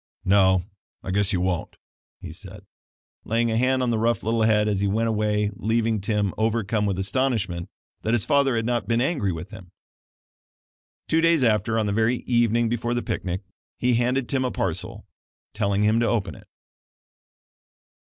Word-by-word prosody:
"No, 95 -2 +4 0.4
I 95 - -4
guess 100 +1 +2
you 90 - 0
won't," 90 -2 -2 0.5
he - - -8
said, - - -11 0.6
laying 115 +1 0
a - - 0
hand 130 +1 +2
on 120 - +1
the 115 - 0
rough 115 +1 +1
little 115 +1 0
head 110 -1 +3
as 100 -2 0
he 100 - +1
went 110 +3 0
away 105 -1 0
leaving 110 +1 0
Tim 100 -1 0
overcome 110 -1 0
with 95 -2 -1
astonishment 100 -4 -1 0.3
that 110 - -1
his 120 - 0
father 140 -4 +2
had 115 -1 -1
not 120 -4 -1
been 115 +1 +1
angry 130 - 0
with 90 +4 -7
him. 95 -5 -11 1.4
Two 160 - +2
days 165 -4 +3
after, 115 0 +2
on 110 - +1
the 100 - -1
very 115 +3 +1
evening 120 -1 +2
before 120 +1 -1
the 120 - -1
picnic, 90 +1 -3 0.4
he 125 0 +1
handed 125 +2 +1
Tim 135 -2 0
a 130 - 0
parcel, - - -3 0.5
telling 100 -1 0
him 110 +2 +3
to 120 - +1
open 110 -5 -1
it. - - -15
110 Hz, 175 wpm, -24 LUFS, 100-120 Hz, 1.4 s, No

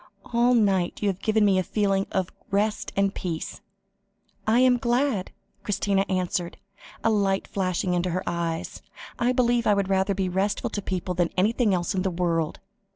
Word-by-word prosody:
All 240 +1 +4
night 195 -5 +1
you 205 - +3
have 190 -1 -4
given 215 -1 +3
me 195 -2 +4
a - - +3
feeling 195 -1 0
of 190 -2 -1 0.2
rest 210 +2 0
and 195 0 +2
peace." 165 -3 -5 0.9
"I 225 +3 +4
am 255 -1 +5
glad," 240 -4 0 0.3
Christina 200 -1 0
answered, 180 -2 -1 0.5
a 225 - +3
light 195 -2 +1
flashing 185 -1 -1
into 180 +1 0
her 180 +2 -2
eyes; 170 -1 -3 0.4
"I 240 +1 +2
believe 240 -2 +2
I 205 - +5
would 200 -1 0
rather 195 +1 +1
be 190 -1 0
restful 195 +3 -1
to 205 - -3
people 185 -1 -3
than 175 -1 +1
anything 215 +3 +2
else 180 +1 0
in 190 - 0
the 190 - 0
world." 170 -3 -1
195 Hz, 175 wpm, -25 LUFS, 180-215 Hz, 0.9 s, am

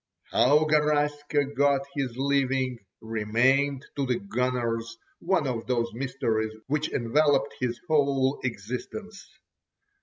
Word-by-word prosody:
How 150 +5 +4
Garaska 145 -1 +1
got 140 0 +3
his 130 -4 -3
living, 135 -2 +1 0.2
remained 125 +6 +1
to 140 -2 -1
the 125 -1 +1
"gunners" 115 +1 -2 0.2
one 170 -3 +1
of 120 -4 -3
those 120 -2 0
mysteries 110 -3 -2
which 150 +2 -1
enveloped 140 +4 +2
his 120 -2 -2
whole 140 -3 +2
existence. 125 - -5
135 Hz, 110 wpm, -27 LUFS, 120-145 Hz, 0.2 s, How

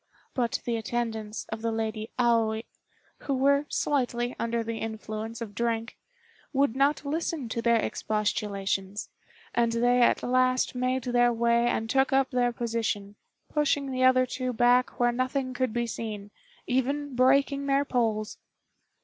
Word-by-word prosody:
But 240 -3 -1
the 235 -1 0
attendants 220 -1 -3
of 220 0 -5
the 230 0 -1
Lady 220 -1 -3
Aoi, 230 -2 +2 0.6
who 275 - -2
were 280 +2 +3
slightly 245 -3 0
under 230 0 -1
the 225 0 -4
influence 220 +1 -5
of 215 -3 -6
drink, 230 +1 -2 0.6
would 275 -3 +2
not 280 +2 +2
listen 310 -2 -2
to 230 - -2
their 235 0 +3
expostulations, 205 -2 -2 0.4
and 235 -1 +2
they 245 +1 +3
at 240 - +3
last 255 0 +2
made 255 0 -1
their 245 0 +3
way 235 0 +2
and 225 -1 0
took 265 +3 +2
up 270 0 +2
their 245 -1 +2
position, 225 -4 -2 0.3
pushing 290 -2 0
the 255 0 0
other 255 0 +5
two 255 0 -3
back 245 +2 +3
where 240 0 +4
nothing 255 +1 -1
could 255 -1 -1
be 240 +1 -1
seen, 210 -3 -5 0.3
even 275 +2 -1
breaking 275 +2 +3
their 275 +1 +2
poles. 225 -5 -1
240 Hz, 150 wpm, -27 LUFS, 225-255 Hz, 0.6 s, other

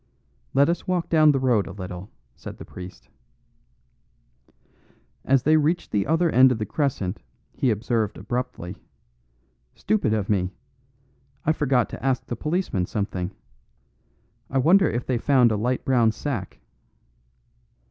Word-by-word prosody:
"Let 140 +1 +5
us 170 - -2
walk 180 -2 -1
down 155 -2 +5
the 140 - +1
road 120 -6 +2
a - - -7
little," 90 0 -7 0.3
said - - -9
the - - -10
priest. 90 0 -11 2.2
As 135 -1 +2
they 155 +1 +4
reached 155 +3 0
the 100 -2 0
other 165 +2 +2
end 130 +1 +6
of 125 - 0
the 110 - -3
crescent 115 - -2 0.3
he 130 - 0
observed 110 -1 -1
abruptly, 105 -5 -4 1.0
"Stupid 110 0 0
of 105 -3 0
me! 95 -2 0 0.9
I 155 - +4
forgot 135 -6 +1
to - - -9
ask 130 -2 0
the 120 - -4
policeman 150 - -1
something. 95 -4 -3 1.2
I 135 - -1
wonder 180 +9 +5
if 120 +1 -3
they 125 -3 0
found 125 -3 +4
a - - +1
light 125 +5 -1
brown 120 -4 +3
sack." 110 -6 -5
125 Hz, 140 wpm, -24 LUFS, 105-145 Hz, 2.2 s, end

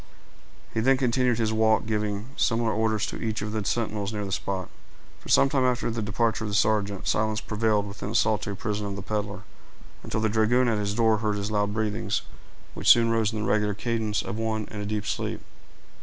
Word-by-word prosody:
He - - 0
then 130 +4 +4
continued 125 -2 +2
his 110 -1 0
walk, 110 0 +3
giving 105 0 -2
similar 115 -4 +1
orders 110 -1 +1
to - - -6
each 110 -2 -2
of 105 - -4
the 110 -1 -2
sentinels 105 -2 -1
near 105 -2 -3
the 95 - -5
spot. 95 -1 -3 0.5
For - - -13
some 135 - +6
time 135 -1 +1
after 125 -2 +1
the 115 0 -3
departure 110 +2 0
of 105 - -3
the 100 - -2
sergeant, 105 -2 +1
silence 110 0 +1
prevailed 105 -2 0
within 100 0 -6
the 110 - -4
solitary 105 -2 +1
prison 105 0 -3
of 100 - -4
the 100 - -6
peddler, 105 0 -3 0.6
until - - -3
the 110 - +2
dragoon 110 +4 +3
at 110 -3 +1
his 100 0 -1
door 110 -1 +3
heard 105 -1 0
his 100 +1 -3
loud 105 -1 +1
breathings, 110 -2 -1 0.5
which - - 0
soon 115 -1 +7
rose 115 -2 +2
into 110 -1 -3
the - - +1
regular 105 -1 +1
cadence 110 -2 -1
of 100 - -5
one 110 -1 -2
in 105 - -5
a 100 - -4
deep 105 -1 -2
sleep. - - -2
110 Hz, 215 wpm, -26 LUFS, 105-115 Hz, 0.6 s, soon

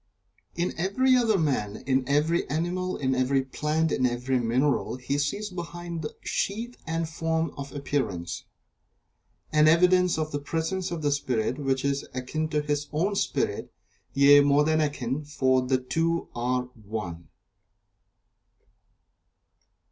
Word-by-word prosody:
In 175 +1 -1
every 255 +9 +3
other 230 -4 +3
man 130 - -1
in 130 -1 +2
every 155 +4 +2
animal 180 +4 -1
in 130 -1 0
every 130 +1 +2
plant 150 +4 -1
in 130 - 0
every 125 +1 0
mineral 125 +4 +1
he 135 +3 -2
sees 200 +9 -2
behind 175 -1 -6
the 150 - -6
sheath 230 +5 -2
and 165 0 -1
form 160 -1 -1
of 140 0 -7
appearance, 130 -12 -3 1.1
an 150 0 +5
evidence 180 +2 +4
of 155 -1 -2
the 145 - -2
presence 165 +6 -2
of 170 -3 -4
the 145 - +2
Spirit 125 -3 -1
which 135 -1 0
is 140 0 0
akin 155 +5 -2
to 150 -1 0
his 145 0 -1
own 185 +7 0
Spirit - - -1 0.4
yea, 140 +1 +8
more 145 +1 +4
than 155 +1 +2
akin, 145 -1 -2
for 130 -3 +2
the 130 +1 +1
two 165 +7 -1
are 125 +1 0
One. 105 - -7
145 Hz, 140 wpm, -27 LUFS, 130-165 Hz, 1.1 s, yea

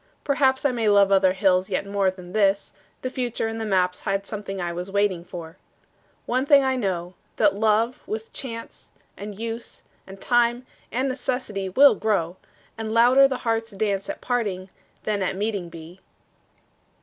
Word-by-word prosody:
Perhaps 270 -1 +2
I 280 - +4
may 230 -3 +1
love 200 -1 +5
other 190 -1 +4
hills 185 -1 +2
yet - - -1
more 200 -1 +1
Than 180 -1 -10
this: 200 -2 +1 0.3
the 255 - -1
future 245 -3 -2
and 225 0 -4
the 220 - -3
maps 180 -2 +1
Hide 195 0 -1
something 200 -2 -5
I 175 -1 -2
was 180 +2 -5
waiting 200 -3 0
for. 170 -1 -9 0.7
One 255 +2 0
thing 280 -1 +6
I 265 0 +1
know, 185 -6 -2 0.2
that 205 -2 +3
love 220 +3 +1
with 220 +1 -5
chance 230 -3 -8 0.3
And 205 0 -8
use 230 +1 -6 0.2
and 195 0 -11
time 240 +2 +2 0.3
and 260 +3 0
necessity 250 -6 -3
Will 275 +9 +7
grow, 190 -5 -1 0.4
and 220 -1 -3
louder 245 +4 +6
the 260 -2 -5
heart's 225 0 0
dance 200 0 -2
At 300 - -5
parting 200 -7 -2 0.3
than 210 -2 -1
at 190 0 -1
meeting 200 -4 -2
be. 165 +2 -11
210 Hz, 170 wpm, -24 LUFS, 190-240 Hz, 0.7 s, Will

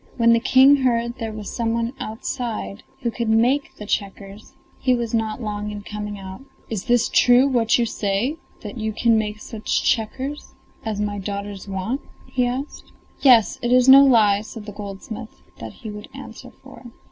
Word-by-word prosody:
When 230 -1 +5
the 230 - +4
King 265 +3 +6
heard 235 -2 0
there 225 -2 -3
was 215 -2 -7
some 230 -1 0
one 230 +1 -2
outside 220 - -5 0.2
who 235 - 0
could 230 -1 -3
make 245 +6 +2
the 210 - -9
checkers 200 0 -5 0.3
he 255 -1 +2
was 235 -2 -3
not 225 +1 -1
long 210 -1 -4
in 205 -1 -7
coming 210 0 -6
out. 190 +2 -9 0.3
"Is 220 +2 -4
it 240 -1 +3
true 245 +2 +5
what 235 -4 +2
you 240 - +1
say, 215 +7 -1 0.2
that 210 +2 -8
you 220 0 -2
can 230 +1 +3
make 210 -1 -1
such 215 0 -2
checkers 260 +5 -2 0.3
as 215 -2 -3
my 205 -1 -2
daughters 200 0 -6
want?" 195 +8 -3 0.2
he 250 -1 0
asked. 260 +4 -6 0.3
"Yes, 245 -6 +5
it 240 - -1
is 250 0 +5
no 270 +1 +10
lie," 215 -6 +4
said 215 0 -10
the 210 - -7
goldsmith; 210 +3 -9 0.2
that - - -7
he 215 - -4
would 210 +1 -9
answer - - -10
for. - - -16
225 Hz, 180 wpm, -22 LUFS, 210-245 Hz, 0.3 s, no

